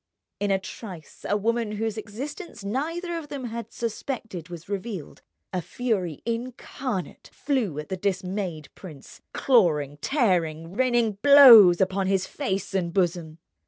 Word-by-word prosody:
In 205 - -1
a 195 - +3
trice 190 -3 -10
a 205 - +2
woman 230 +1 -1
whose 220 0 -2
existence 225 - -7
neither 330 - -3
of 310 - -10
them 280 -2 -6
had 230 -2 -6
suspected 225 - -5
was 170 -2 -9
revealed, 200 -4 -6 0.3
a 180 - -1
fury 190 - -3
incarnate 235 -2 -5
flew 245 - -1
at 150 0 -6
the 190 - -3
dismayed 185 -4 -3
prince, 155 -8 -12
clawing, 155 - +2
tearing, 175 - 0
raining 235 -3 +1
blows 235 -11 +9
upon 190 0 +1
his 190 -1 +1
face 195 -9 -3
and 180 -3 -1
bosom. 170 -3 -1
200 Hz, 135 wpm, -25 LUFS, 180-240 Hz, 0.3 s, blows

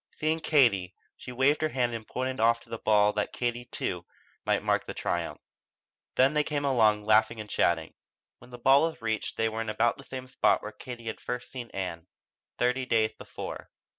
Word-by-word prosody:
Seeing 155 +1 0
Katie, 115 - +3 0.2
she - - -9
waved 135 +5 +2
her 155 - +1
hand 125 -4 0
and 115 -1 -6
pointed 130 0 -3
off 115 +1 +3
to - - -19
her 115 - -3
ball 105 -1 +4
that 105 -1 -1
Katie, 120 0 -2
too, 90 -7 -4 0.4
might - - +1
mark - - +1
the - - -6
triumph. - - -2 0.8
Then 135 +3 +4
they 150 0 +3
came 145 -1 -2
along, 110 -6 +3
laughing 110 +1 +3
and 105 - -6
chatting. 80 -5 +1 0.5
When - - -16
the 125 - -9
ball 135 +3 +5
was 160 - -12
reached 110 -2 -2
they 115 - +2
were 110 0 -3
in 110 - -3
about 115 +2 +1
the 130 -1 -8
spot 130 - +2
where 105 - -5
Katie 120 +1 -9
had 110 - -5
first 125 0 -5
seen 125 -3 -7
Ann, 90 -3 -5 0.5
thirty 125 +1 +1
days 110 -2 +2
before. - - -8
115 Hz, 195 wpm, -28 LUFS, 110-130 Hz, 0.8 s, ball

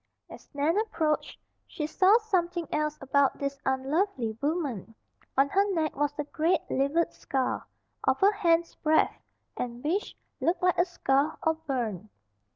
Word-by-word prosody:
As - - -12
Nan 310 +7 +2
approached 320 -9 -1 0.3
she 300 - -4
saw 375 +7 +5
something 355 -7 -1
else 305 0 0
about 275 0 +2
this 280 0 -3
unlovely 265 - 0
woman. 280 - -2 0.4
On 275 +1 +5
her 395 +5 +3
neck 315 -2 0
was 290 0 +1
a 295 - -1
great, 320 +4 +1
livid 280 +5 +1
scar, 265 -2 -2 0.4
of - - +2
a 405 +2 +6
hand's 340 -4 +2
breadth, 315 0 +2 0.4
and 240 0 -4
which 355 +8 -1 0.2
looked 350 +2 0
like 360 -1 +3
a 350 - +5
scald, 295 -4 0
or 320 - +3
burn. 240 - -4
305 Hz, 150 wpm, -28 LUFS, 275-345 Hz, 0.4 s, a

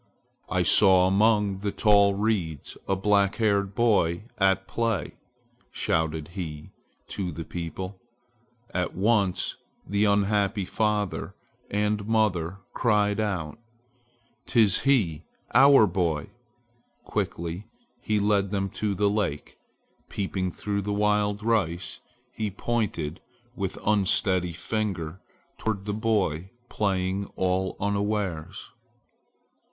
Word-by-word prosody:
"I - - +1
saw 95 -3 +6
among 100 0 +3
the 100 0 -2
tall 100 -2 +4
reeds 95 -8 -2
a 95 - +2
black 100 0 +2
haired 100 -3 +1
boy 100 -7 +2 0.2
at 95 -1 +2
play!" 115 -3 -1 0.6
shouted 80 -1 -1
he 80 -5 -7 0.4
to 95 -3 -3
the 80 0 -6
people. 95 +3 -6 0.7
At - - -2
once 100 -2 +1 0.3
the 100 +2 +1
unhappy 100 0 +1
father 105 -1 -1 0.3
and 105 0 -1
mother 100 -6 +1 0.2
cried 105 -3 +2
out, 95 -5 -2 0.9
"'Tis 110 -5 +4
he, 100 - +1 0.3
our 135 -2 +7
boy!" 85 -6 -1 0.7
Quickly 85 +4 -3 0.3
he 105 -1 0
led 100 -1 +2
them 95 -1 -2
to 105 -2 -2
the 105 +2 +2
lake. 100 -8 -2 0.5
Peeping 95 -2 -2
through 100 +3 -3
the 105 +1 -3
wild 105 0 +1
rice, 95 -6 -1 0.3
he 110 -1 -3
pointed 95 -7 -2 0.3
with 95 -2 -3
unsteady 95 -3 +2
finger 95 -2 -3 0.4
toward 105 -3 -2
the 105 - -2
boy 100 -6 0 0.2
playing 95 -1 -1
all 95 0 0
unawares. 100 -5 -2
100 Hz, 105 wpm, -26 LUFS, 90-105 Hz, 0.9 s, our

